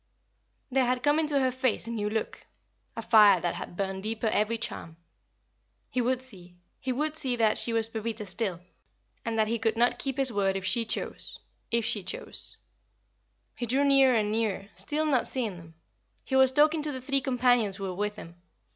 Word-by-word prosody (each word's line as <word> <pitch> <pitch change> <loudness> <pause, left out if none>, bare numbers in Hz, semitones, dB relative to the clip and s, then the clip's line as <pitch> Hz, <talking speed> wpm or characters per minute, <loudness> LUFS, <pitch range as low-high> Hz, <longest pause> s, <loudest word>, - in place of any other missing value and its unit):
There 260 0 +3
had 250 0 0
come 295 +1 +3
into 300 -3 +2
her 260 -1 +2
face 255 -2 0
a 230 - -5
new 210 -2 -2
look 220 0 -4 0.5
a 230 - -4
fire 210 -5 +6
that 175 0 -2
had 175 - -8
burned 195 -1 -2
deeper 220 +2 -3
every 220 +1 +1
charm. 165 -7 -4 0.9
He 255 - 0
would 255 +1 +1
see 180 -8 -8 0.2
he 260 - -3
would 300 +4 -1
see 260 -5 0
that 225 -2 +3
she 235 - +4
was 225 -1 +1
Pepita 225 -1 -5
still, 190 -3 -3 0.6
and 230 -1 -3
that 215 -1 +2
he 230 +1 -1
could 225 0 0
not 240 +1 +2
keep 270 -1 -3
his 265 -3 +1
word 195 -1 +1
if 190 - -6
she 230 +3 +2
chose 220 - -3 0.3
if 235 -1 +1
she 210 - 0
chose. 185 - -6 1.0
He 240 - -4
drew 265 +5 +2
nearer 270 -2 +5
and 210 -2 +1
nearer, 215 -3 -2
still 310 +1 -2
not 275 -5 +1
seeing 225 -8 -3
them. 165 -1 -15 0.5
He 265 - -2
was 265 -1 +6
talking 300 +3 +4
to 300 0 -2
the 260 - -5
three 275 +1 0
companions 245 -5 +2
who 195 - -8
were 190 -1 -3
with 210 +3 -2
him. 170 -3 -12
230 Hz, 200 wpm, -28 LUFS, 210-260 Hz, 1.0 s, fire